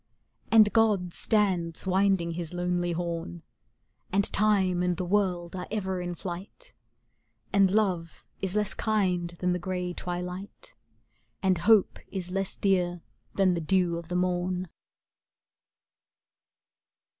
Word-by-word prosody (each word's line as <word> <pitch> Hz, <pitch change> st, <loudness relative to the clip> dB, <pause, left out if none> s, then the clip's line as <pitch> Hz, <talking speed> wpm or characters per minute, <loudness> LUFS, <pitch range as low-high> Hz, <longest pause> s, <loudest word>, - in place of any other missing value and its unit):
And 215 Hz, -2 st, +6 dB
God 205 Hz, -6 st, +2 dB
stands 185 Hz, -7 st, +1 dB
winding 190 Hz, -2 st, +2 dB
his 170 Hz, 0 st, -5 dB
lonely 175 Hz, 0 st, 0 dB
horn; 165 Hz, -, -4 dB, 0.7 s
And 200 Hz, +1 st, +1 dB
Time 195 Hz, -4 st, +3 dB
and 180 Hz, -1 st, 0 dB
the 180 Hz, -, -2 dB
World 180 Hz, -2 st, 0 dB
are 180 Hz, -1 st, -5 dB
ever 190 Hz, -3 st, -2 dB
in 175 Hz, 0 st, -4 dB
flight, 195 Hz, -, -8 dB, 0.8 s
And 195 Hz, -1 st, +5 dB
love 185 Hz, -5 st, -1 dB, 0.2 s
is 190 Hz, 0 st, -2 dB
less 210 Hz, -1 st, +1 dB
kind 185 Hz, -6 st, 0 dB
than 180 Hz, +1 st, 0 dB
the 180 Hz, -, -2 dB
gray 180 Hz, 0 st, -3 dB
twi 175 Hz, 0 st, -4 dB
light, 180 Hz, -, -8 dB, 0.7 s
And 185 Hz, -3 st, +2 dB
hope 215 Hz, +1 st, +4 dB
is 180 Hz, -2 st, -5 dB
less 195 Hz, 0 st, -2 dB
dear 180 Hz, -3 st, +1 dB, 0.3 s
than 190 Hz, -2 st, +3 dB
the 170 Hz, -, -2 dB
dew 180 Hz, +1 st, +2 dB
of 170 Hz, -1 st, -8 dB
the 180 Hz, -, -4 dB
morn. 180 Hz, 0 st, -1 dB
180 Hz, 130 wpm, -28 LUFS, 175-195 Hz, 0.8 s, And